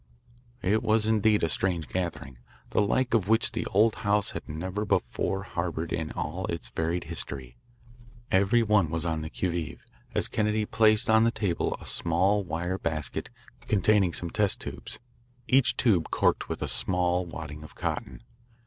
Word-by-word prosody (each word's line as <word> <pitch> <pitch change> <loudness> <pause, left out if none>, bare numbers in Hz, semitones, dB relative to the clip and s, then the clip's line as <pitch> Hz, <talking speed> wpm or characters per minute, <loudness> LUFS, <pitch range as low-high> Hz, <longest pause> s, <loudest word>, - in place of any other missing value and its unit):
It 105 +4 +2
was 110 0 +2
indeed 110 -1 +3
a - - +4
strange 85 -1 0
gathering, 85 -8 -4 0.3
the - - +3
like 120 +4 +1
of 105 -5 +2
which 110 +1 +3
the - - -3
old 110 +3 +4
house 105 -3 +1
had - - -7
never 90 +7 -3
before 95 -1 0
harboured 85 -3 -3
in 80 -2 -2
all 90 +5 -3
its 85 -1 -4
varied 80 +2 -1
history. 65 -3 -6 0.8
Every 100 +5 +4
one 105 -6 +3
was 80 +1 -2
on 80 -2 -1
the 80 - -5
qui 95 - -2
vive, 85 -2 -4 0.3
as - - +1
Kennedy 105 0 0
placed 110 0 +3
on 110 0 +5
the 115 - +4
table 100 -7 -1
a - - -11
small 95 +5 +1
wire 90 +2 -3
basket 80 -2 -3 0.4
containing 100 -2 +3
some 85 0 -3
test 105 -3 +2
tubes, - - -6 0.5
each 125 -2 +3
tube 95 -10 +2
corked - - +1
with - - -3
a - - -2
small 90 0 +1
wadding 75 -2 -7
of 75 - -12
cotton. 60 -2 -4
95 Hz, 165 wpm, -28 LUFS, 80-105 Hz, 0.8 s, on